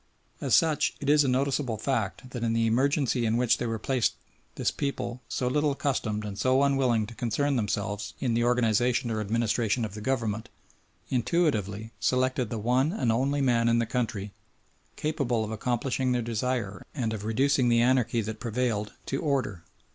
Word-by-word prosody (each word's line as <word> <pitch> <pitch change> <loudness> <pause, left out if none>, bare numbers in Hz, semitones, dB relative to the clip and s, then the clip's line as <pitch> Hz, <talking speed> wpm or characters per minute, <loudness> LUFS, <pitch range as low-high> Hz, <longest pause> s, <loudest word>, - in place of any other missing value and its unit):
As - - +3
such 160 -3 +2
it 145 0 +1
is 150 0 +5
a - - 0
noticeable 130 -2 0
fact 120 +1 -2
that 120 -2 -4
in 115 -1 +1
the 115 0 +2
emergency 130 +2 +2
in 115 0 +1
which 125 -1 +2
they 120 - -1
were 115 0 -2
placed 125 +2 0 0.4
this - - 0
people, 125 -3 -3
so 125 - -1
little 150 +4 +2
accustomed 110 -7 -1
and 100 -1 -6
so 130 +2 +3
unwilling 130 -6 +2
to 115 - -10
concern 125 +5 0
themselves 105 -1 -2
in 125 -4 0
the 120 +1 +2
organisation 120 0 +2
or 110 -1 -1
administration 115 +1 0
of 105 - -7
the 105 - -7
government, 110 -4 -1 0.6
intuitively 115 - 0
selected 130 -2 +1
the 115 - -3
one 125 +7 +2
and 130 - 0
only 135 +5 +1
man 120 -3 +3
in 115 - +3
the 115 - +2
country 110 -4 -3 0.6
capable 135 -7 -1
of 105 - -6
accomplishing 125 +3 -1
their 120 -1 0
desire 115 -2 -2
and 115 -6 -1
of 105 -2 -5
reducing 130 +3 +2
the 115 0 +4
anarchy 120 -2 +2
that 110 0 -5
prevailed 115 -2 -1
to 135 - -2
order. 130 - -1
120 Hz, 180 wpm, -28 LUFS, 110-130 Hz, 0.6 s, is